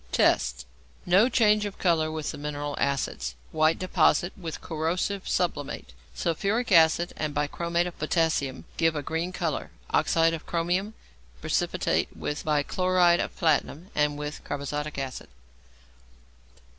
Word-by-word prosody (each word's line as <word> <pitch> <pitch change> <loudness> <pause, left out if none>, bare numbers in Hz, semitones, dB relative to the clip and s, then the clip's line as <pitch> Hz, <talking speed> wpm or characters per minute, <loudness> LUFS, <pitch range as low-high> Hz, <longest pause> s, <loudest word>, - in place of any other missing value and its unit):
Tests. - - +2 0.4
No 195 +7 +5
change 215 -3 +4
of 205 -2 -5
colour 160 -3 +2
with 155 -1 -3
the - - -8
mineral 145 0 -4
acids. 135 - -1 0.2
White 155 +1 +3
deposit 175 -1 +2
with 165 -5 -6
corrosive 175 +5 -2
sublimate. 145 - -2 0.2
Sulphuric 200 +8 -1
acid 170 0 +5
and 150 -1 -3
bichromate 170 +4 0
of 180 - -7
potassium 155 -4 0
give 165 -1 +2
a 145 - -2
green 165 +4 -2
colour, 170 -5 -2 0.2
oxide 165 0 +3
of 165 - -6
chromium. 180 +5 -1 0.4
Precipitate - - 0
with 150 - -3
bichloride 175 +4 +3
of - - -3
platinum 160 +2 0
and 150 -1 +1
with 150 0 -6
carbazotic 145 +1 -4
acid. 135 -9 -5
160 Hz, 130 wpm, -27 LUFS, 150-180 Hz, 0.4 s, No